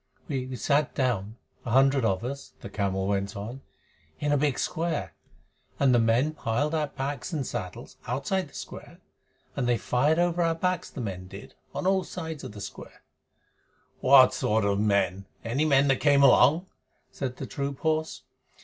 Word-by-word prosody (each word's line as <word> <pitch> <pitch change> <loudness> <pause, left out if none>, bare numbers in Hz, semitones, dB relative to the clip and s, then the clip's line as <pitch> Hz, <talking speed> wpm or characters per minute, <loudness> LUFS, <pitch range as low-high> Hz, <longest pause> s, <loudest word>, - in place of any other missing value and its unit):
"We 130 -2 -3
sat 145 +2 +1
down 110 -5 -1 0.3
a - - -5
hundred 135 +2 +4
of 95 -2 0
us," 140 +2 -6
the 100 - -8
camel 95 -2 -1
went 100 +1 -1
on, 115 +7 -6 0.6
"in 145 0 0
a - - +4
big 145 -1 +1
square, 160 - -2 0.7
and 135 -2 +4
the 120 - +5
men 115 +7 +2
piled 145 +3 -1
our 155 -2 +1
packs 140 +3 -4
and 145 -4 -1
saddles, 90 -5 -6
outside 140 +8 -1
the - - -18
square, - - -9 0.6
and 125 -3 0
they 120 - +3
fired 140 +8 +1
over 175 0 +1
our 165 -1 +2
backs, 180 +2 -1
the 130 - -7
men 95 -4 -5
did, 95 +2 -11 0.2
on - - -3
all 190 0 +3
sides 160 -4 -6
of - - -7
the 105 - -9
square." - - -10 1.0
"What 130 -1 +7
sort 110 0 +1
of 100 0 +1
men? 100 -2 +1 0.2
Any 130 +7 0
men 140 -2 +4
that 135 - +4
came 140 -1 +4
along?" 140 +6 +6 0.5
said 130 -2 -4
the - - -5
troop 140 -1 -4
horse. 160 0 -1
135 Hz, 175 wpm, -27 LUFS, 110-150 Hz, 1.0 s, What